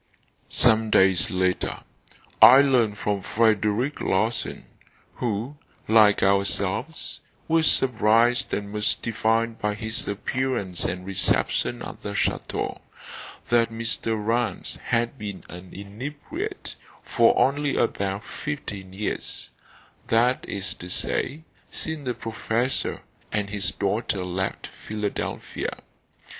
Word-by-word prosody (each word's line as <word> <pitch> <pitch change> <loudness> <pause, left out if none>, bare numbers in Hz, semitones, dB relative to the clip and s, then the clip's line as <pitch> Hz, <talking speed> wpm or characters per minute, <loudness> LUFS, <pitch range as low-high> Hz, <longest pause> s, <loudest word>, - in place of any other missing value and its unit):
Some 110 0 +4
days 95 -3 +4
later, 95 -1 0 0.6
I 130 +3 +10
learned 120 -7 +2
from 105 -1 -1
Frederic 110 +5 +1
Larsan 110 +5 -1 0.5
who, 120 +5 -2 0.3
like 110 -2 +5
ourselves, 100 +10 0 0.3
was 160 -1 +4
surprised 120 0 +3
and 100 0 -3
mystified 115 +1 0
by 105 0 -1
his 110 +1 -1
appearance 105 -3 -1
and 90 0 -3
reception 95 -1 0
at - - -8
the - - -5
chateau - - -2 0.7
that 120 -1 +3
Mr. 115 0 -2
Rance 110 -1 -1
had 120 +3 0
been 100 -3 -6
an 90 +1 -10
inebriate 145 - -6 0.3
for - - +3
only 145 +1 +2
about 100 -2 -1
fifteen 100 -11 -6
years; 105 +2 -3 0.6
that 120 +3 +3
is 100 0 -2
to 90 - -10
say, 140 - -1 0.3
since 160 -3 -5
the 125 - -1
professor 115 +3 -2 0.3
and 105 -2 -1
his 100 -2 +1
daughter 100 -1 -1
left 95 +1 -3
Philadelphia. 105 -1 -4
110 Hz, 105 wpm, -25 LUFS, 100-120 Hz, 0.7 s, I